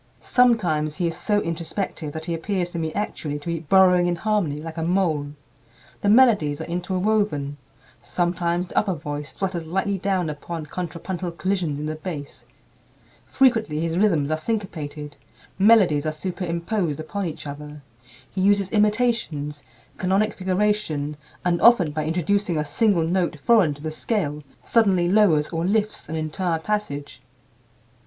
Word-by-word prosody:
Sometimes 180 Hz, -12 st, +2 dB
he 175 Hz, -, -1 dB
is 165 Hz, -1 st, -1 dB
so 205 Hz, +3 st, +1 dB
introspective 165 Hz, -1 st, -4 dB
that 160 Hz, +1 st, -6 dB
he 170 Hz, -, -2 dB
appears 175 Hz, +1 st, -2 dB
to 170 Hz, -, -4 dB
me 160 Hz, -1 st, -2 dB
actually 155 Hz, -8 st, -3 dB
to 145 Hz, -, -12 dB
be 170 Hz, -1 st, -1 dB
burrowing 180 Hz, +2 st, +4 dB
in 175 Hz, -, +1 dB
harmony 190 Hz, -6 st, 0 dB
like 160 Hz, +2 st, -7 dB
a -, -, -2 dB
mole. 165 Hz, -4 st, +1 dB, 0.7 s
The 205 Hz, -, +2 dB
melodies 210 Hz, -, +5 dB
are -, -, -4 dB
interwoven; 180 Hz, -4 st, -1 dB, 0.4 s
sometimes 175 Hz, +7 st, -1 dB
the -, -, +2 dB
upper 195 Hz, -4 st, -1 dB
voice 145 Hz, -2 st, -6 dB
flutters 180 Hz, -4 st, -3 dB
lightly 190 Hz, +3 st, -1 dB
down 185 Hz, -2 st, 0 dB
upon 155 Hz, +2 st, -5 dB
"contrapuntal 175 Hz, +2 st, -5 dB
collisions 175 Hz, -5 st, -1 dB
in 150 Hz, -, -4 dB
the 155 Hz, -, -2 dB
bass"; 155 Hz, -2 st, -7 dB, 0.8 s
frequently 225 Hz, -, +2 dB
his 165 Hz, 0 st, -1 dB
rhythms 170 Hz, -7 st, +2 dB
are 155 Hz, -, 0 dB
syncopated; 155 Hz, -8 st, -4 dB, 0.4 s
melodies 190 Hz, -8 st, +5 dB
are -, -, +1 dB
superimposed 170 Hz, 0 st, -2 dB
upon 190 Hz, +5 st, -3 dB
each 155 Hz, -, -7 dB
other; 150 Hz, 0 st, -8 dB, 0.4 s
he 190 Hz, -, -4 dB
uses 200 Hz, 0 st, +3 dB
"imitations," 210 Hz, -10 st, 0 dB, 0.4 s
canonic 195 Hz, +3 st, +1 dB
figuration, 185 Hz, -6 st, 0 dB, 0.3 s
and 175 Hz, -1 st, +1 dB
often 215 Hz, -10 st, +6 dB
by 155 Hz, 0 st, -2 dB
introducing 175 Hz, +2 st, 0 dB
a 150 Hz, -, 0 dB
single 175 Hz, +3 st, +2 dB
note 175 Hz, -1 st, 0 dB
foreign 195 Hz, -10 st, +4 dB
to 145 Hz, -, -14 dB
the 155 Hz, -, -3 dB
scale, 155 Hz, -4 st, -2 dB, 0.2 s
suddenly 195 Hz, -7 st, +3 dB
lowers 175 Hz, -7 st, +4 dB
or 165 Hz, -1 st, -2 dB
lifts 210 Hz, -1 st, 0 dB
an 160 Hz, -, -3 dB
entire 165 Hz, +2 st, -1 dB
passage. 145 Hz, -9 st, -4 dB
175 Hz, 150 wpm, -23 LUFS, 155-200 Hz, 0.8 s, often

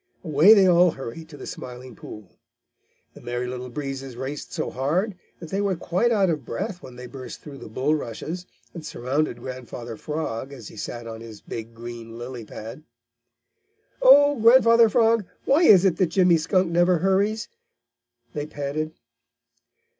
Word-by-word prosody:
Away 160 Hz, +8 st, +6 dB
they 195 Hz, -2 st, +6 dB
all 180 Hz, 0 st, +6 dB
hurried 160 Hz, +3 st, -7 dB
to 145 Hz, -, -11 dB
the -, -, -9 dB
Smiling 125 Hz, -1 st, -8 dB
Pool. 105 Hz, -4 st, -11 dB, 0.8 s
The -, -, -14 dB
Merry 120 Hz, +1 st, -3 dB
Little 125 Hz, 0 st, -6 dB
Breezes 135 Hz, -1 st, -6 dB
raced 135 Hz, +4 st, -6 dB
so -, -, -3 dB
hard 170 Hz, -, 0 dB, 0.3 s
that 165 Hz, -, -9 dB
they 195 Hz, -, 0 dB
were 200 Hz, -2 st, 0 dB
quite 180 Hz, +7 st, 0 dB
out 205 Hz, -4 st, +3 dB
of 150 Hz, -4 st, -3 dB
breath 175 Hz, +11 st, -5 dB
when 125 Hz, -, -11 dB
they 125 Hz, 0 st, -9 dB
burst 130 Hz, 0 st, -9 dB
through 140 Hz, -3 st, -10 dB
the -, -, -10 dB
bulrushes 150 Hz, +7 st, -3 dB, 0.3 s
and 170 Hz, -, -8 dB
surrounded 135 Hz, 0 st, -2 dB
Grandfather 120 Hz, -2 st, -7 dB
Frog, 140 Hz, -1 st, -4 dB
as 120 Hz, -6 st, -10 dB
he -, -, -14 dB
sat 120 Hz, +3 st, -6 dB
on 115 Hz, 0 st, -8 dB
his 110 Hz, -2 st, -10 dB
big 115 Hz, 0 st, -8 dB
green 115 Hz, -1 st, -9 dB
lily 120 Hz, 0 st, -7 dB
pad. 110 Hz, +7 st, -9 dB, 1.2 s
"Oh, 290 Hz, -, +7 dB
Grandfather 230 Hz, 0 st, +6 dB
Frog, 225 Hz, 0 st, +3 dB, 0.2 s
why 285 Hz, +5 st, +4 dB
is 195 Hz, -, +7 dB
it 175 Hz, -4 st, +2 dB
that 185 Hz, -, +3 dB
Jimmy 175 Hz, 0 st, +4 dB
Skunk 175 Hz, +2 st, +1 dB
never 175 Hz, +1 st, +3 dB
hurries?" 195 Hz, +5 st, +1 dB, 0.9 s
they 150 Hz, 0 st, -4 dB
panted. 155 Hz, +2 st, -4 dB
150 Hz, 160 wpm, -24 LUFS, 125-185 Hz, 1.2 s, Oh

